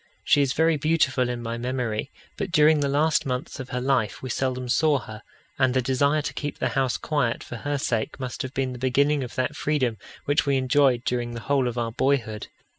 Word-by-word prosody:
She 145 - +4
is 135 -1 +1
very 160 0 +3
beautiful 135 -5 +1
in 120 -1 -4
my 115 0 -4
memory, 125 -1 -2 0.3
but 200 -3 -4
during 155 -2 +5
the 140 -1 0
last 150 +3 +2
months 130 +2 -4
of 130 -1 -6
her 125 - -2
life 130 -4 0
we 130 - -3
seldom 130 0 -2
saw 150 +4 +3
her, 110 -4 -9 0.4
and 130 -1 +3
the 130 - +3
desire 140 +4 +2
to - - -3
keep 145 -1 -4
the - - 0
house 130 -2 0
quiet 135 -7 -1
for 120 - -7
her 145 +3 -2
sake 120 -1 -2
must 130 -2 -4
have 130 - -5
been 130 -1 -1
the 125 - -8
beginning 140 +3 +2
of 125 - -8
that 135 +3 -1
freedom 130 -9 0 0.3
which 145 +2 +2
we 140 -1 +1
enjoyed 130 -1 +3
during 120 -1 -2
the 115 - -6
whole 135 +1 +1
of 120 0 -4
our 115 -1 -1
boyhood. 115 -4 0
130 Hz, 220 wpm, -25 LUFS, 125-145 Hz, 0.4 s, during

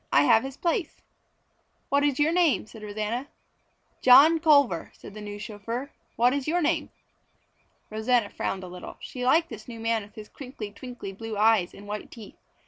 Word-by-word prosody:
"I 140 - +5
have 220 +9 +5
his 270 0 -7
place." 340 0 -1 0.9
"What 280 +1 +2
is 285 -2 +1
your 300 +2 +3
name?" 340 -8 +2
said 220 0 -13
Rosanna. 215 +5 -3 0.7
"John 285 +6 +7
Culver," 285 - +3
said - - -12
the 215 - -9
new 205 0 -7
chauffeur. 225 +5 -6 0.2
"What 245 +2 +3
is 280 -1 -2
your 345 +3 +1
name?" 325 0 0 1.0
Rosanna 220 0 +1
frowned 190 -1 -3
a - - -7
little. 180 0 -9
She 250 - -7
liked 325 +7 +3
this 220 -2 -10
new 230 -2 -8
man 225 0 0
with 205 0 -14
his 215 -1 -9
crinkly, 250 -6 -8
twinkly 245 -2 -8
blue 225 +1 -6
eyes 215 -4 +3
and 200 - -12
white 210 0 -5
teeth. 220 -4 -12
230 Hz, 180 wpm, -26 LUFS, 210-280 Hz, 1.0 s, John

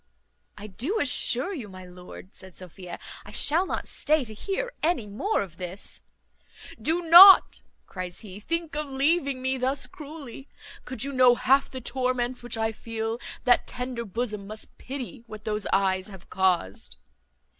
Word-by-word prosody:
"I 205 - -9
do 245 - -3
assure 255 +4 +4
you, 245 - -7
my 185 -1 -11
lord," 180 +1 -13
said 190 -2 -13
Sophia, 180 -1 -10 0.3
"I - - -13
shall 310 - +3
not - - -4
stay 310 -1 +1
to 220 - -7
hear 410 - -4
any 310 -8 0
more 210 - -1
of 170 -4 -13
this." 180 +2 -5 0.8
"Do 335 +3 0
not," 360 +4 +9 0.2
cries 180 0 -6
he, 200 -3 -10
"think 335 +7 -3
of 300 -1 -4
leaving 275 -1 0
me 260 0 -1
thus 265 +1 -1
cruelly; 285 -1 -11 0.4
could 255 -1 -3
you 280 0 -3
know 255 -2 +5
half 270 +3 +2
the 260 - -8
torments 250 0 -2
which 240 -1 -4
I 225 0 0
feel, 225 +1 -5 0.2
that 245 -1 +3
tender 250 -1 -5
bosom 210 -1 -4
must 215 +1 -9
pity 265 -2 -7
what 215 -1 -11
those 210 -1 -3
eyes 190 0 +1
have 190 -4 -14
caused." 135 - 0
240 Hz, 160 wpm, -26 LUFS, 200-280 Hz, 0.8 s, not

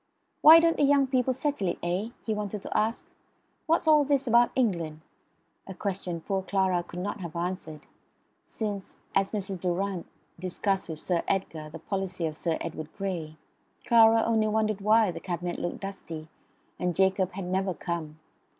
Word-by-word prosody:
"Why 320 +2 +10
don't 330 0 +3
the - - +2
young 280 -1 +5
people 260 -1 +1
settle 265 -6 -1
it, 175 - -1
eh?" 180 +6 -1 0.2
he 220 - 0
wanted 210 -1 -4
to - - -6
ask. 220 +2 0 0.6
"What's 325 0 +2
all 305 -2 +6
this 280 -1 +1
about 240 0 +5
England?" 170 -11 0 0.7
a 190 - -7
question 180 -4 -3
poor 195 +3 -1
Clara 190 -2 +1
could 175 - -11
not 205 +3 -3
have 170 -3 -7
answered, 170 -3 -4 0.6
since, 205 -3 -5 0.2
as 195 0 +2
Mrs. 195 -3 -3
Durrant 185 +1 -2 0.3
discussed 185 +1 -1
with 155 -1 -6
Sir 175 -2 +1
Edgar 160 -5 -2
the 160 - -8
policy 185 0 -3
of 155 -1 -3
Sir 165 +1 -1
Edward 155 0 -5
Grey, 170 -6 -4 0.5
Clara 225 -1 +6
only 220 -1 +2
wondered 215 -1 0
why 215 -1 +4
the - - -7
cabinet 175 -1 -4
looked 175 - -4
dusty, 165 -5 -7 0.5
and 180 -1 -1
Jacob 190 -1 +2
had 190 0 -5
never 185 0 -1
come. 160 -3 -4
190 Hz, 170 wpm, -28 LUFS, 175-220 Hz, 0.7 s, Why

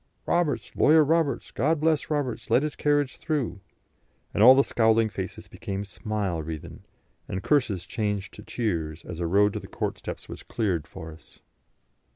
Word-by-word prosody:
"Roberts! 150 -10 0
Lawyer 155 +1 +6
Roberts! 150 -4 +1
God 155 +5 +1
bless 155 0 +1
Roberts! 145 -6 -2
Let 135 - +4
his 150 - -2
carriage 145 -2 +1
through." 150 -10 -2 0.7
And - - 0
all 125 +4 +10
the 135 - +5
scowling 110 -2 +3
faces 95 -3 -6
became 100 +1 -5
smile 100 -4 -3
wreathen, 80 -1 -7 0.4
and 95 - -4
curses 125 - +1
changed 105 -3 -2
to - - -10
cheers, 85 -9 -3
as 85 - -7
a 85 - -1
road 100 +3 +4
to - - -3
the - - -10
court - - -3
steps - - -7
was - - -8
cleared 90 -9 -2
for 80 0 -9
us. 80 - -17
110 Hz, 170 wpm, -26 LUFS, 95-145 Hz, 0.7 s, all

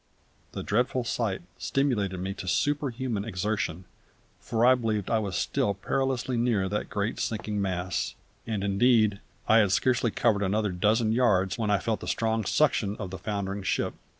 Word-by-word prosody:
The - - -4
dreadful 125 +3 +1
sight 110 -6 -2 0.2
stimulated 105 -10 0
me 95 +2 -3
to 90 - -8
superhuman 130 -4 0
exertion, 95 -4 -2 0.5
for 115 +1 0
I 130 - +8
believed 110 -5 -1
I 110 - +3
was 100 -4 -3
still 100 -1 0
perilously 130 +4 -1
near 115 -5 +1
that 105 +2 -2
great 105 +2 -2
sinking 105 -2 -2
mass; 90 -2 -2 0.3
and 105 -3 -2
indeed 105 0 +3 0.3
I 115 -1 +6
had 105 -4 +3
scarcely 120 +2 +2
covered 110 -1 +1
another 105 +1 0
dozen 110 +5 +2
yards 105 -4 +2
when 110 -2 0
I 105 - +4
felt 110 +3 -2
the - - -8
strong 110 -1 0
suction 110 -8 +2
of 95 -4 -6
the 95 - -6
foundering 100 0 -3
ship. - - -1
105 Hz, 165 wpm, -27 LUFS, 100-120 Hz, 0.5 s, I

